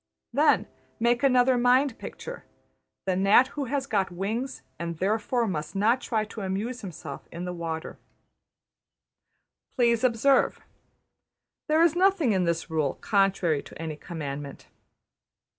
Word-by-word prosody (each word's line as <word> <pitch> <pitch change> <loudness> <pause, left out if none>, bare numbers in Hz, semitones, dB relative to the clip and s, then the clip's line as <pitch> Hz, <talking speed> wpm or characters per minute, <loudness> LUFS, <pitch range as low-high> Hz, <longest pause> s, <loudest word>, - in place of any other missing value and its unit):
Then 295 +5 +4 0.3
make 240 +1 +2
another 255 -2 +4
mind 250 +1 +3
picture: - - -8 0.6
The 190 -1 +1
gnat 200 +7 +5
who 285 -1 -4
has 270 +1 -2
got 200 -7 0
wings, 215 +9 -4 0.2
and 170 -1 -4
\emph{therefore 220 +5 0
must 155 -2 -4
not 225 +6 +2
try 220 -3 -1
to 215 0 -8
amuse 210 +6 -3
himself 165 -7 -8
in 170 +2 -6
the 180 - -4
water}. 165 -2 -5 1.8
Please 235 -2 +2
observe: 255 +2 +3 1.1
There 315 +1 +4
is 335 -1 +3
nothing 365 - +3
in 185 -3 +2
this 170 0 -1
rule 155 -4 -1
contrary 195 -7 +1
to - - -13
any 160 -2 -4
commandment. 145 -3 -7
210 Hz, 130 wpm, -27 LUFS, 170-250 Hz, 1.8 s, gnat